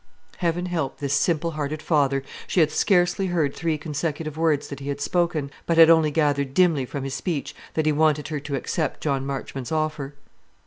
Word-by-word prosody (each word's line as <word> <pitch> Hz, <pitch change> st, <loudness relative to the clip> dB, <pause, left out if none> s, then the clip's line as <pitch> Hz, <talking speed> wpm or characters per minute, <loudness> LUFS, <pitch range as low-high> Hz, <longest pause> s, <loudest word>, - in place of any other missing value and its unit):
Heaven 175 Hz, 0 st, 0 dB
help 165 Hz, -6 st, -2 dB
this 140 Hz, -2 st, -2 dB
simple 165 Hz, +1 st, +1 dB
hearted 155 Hz, 0 st, -3 dB
father! 140 Hz, -4 st, +1 dB, 0.2 s
She -, -, +1 dB
had 155 Hz, -2 st, +4 dB
scarcely 180 Hz, +2 st, +2 dB
heard 160 Hz, -6 st, 0 dB
three 165 Hz, -2 st, -1 dB
consecutive 150 Hz, 0 st, -3 dB
words 160 Hz, -3 st, +1 dB
that 140 Hz, -, -7 dB
he 140 Hz, +1 st, -6 dB
had 140 Hz, -, -3 dB
spoken, 160 Hz, -2 st, 0 dB, 0.2 s
but 165 Hz, -, +1 dB
had 165 Hz, 0 st, +9 dB
only 160 Hz, -2 st, +5 dB
gathered 145 Hz, -3 st, 0 dB
dimly 165 Hz, -8 st, +3 dB
from 140 Hz, +1 st, -5 dB
his 135 Hz, -1 st, -4 dB
speech 160 Hz, -3 st, -3 dB, 0.2 s
that 155 Hz, -, +1 dB
he 155 Hz, -, +4 dB
wanted 150 Hz, 0 st, +2 dB
her 155 Hz, -2 st, -2 dB
to 140 Hz, 0 st, -4 dB
accept 155 Hz, +4 st, -2 dB
John 135 Hz, -2 st, -1 dB
Marchmont's 135 Hz, -1 st, -5 dB
offer. 155 Hz, -3 st, -2 dB
155 Hz, 190 wpm, -24 LUFS, 140-165 Hz, 0.2 s, had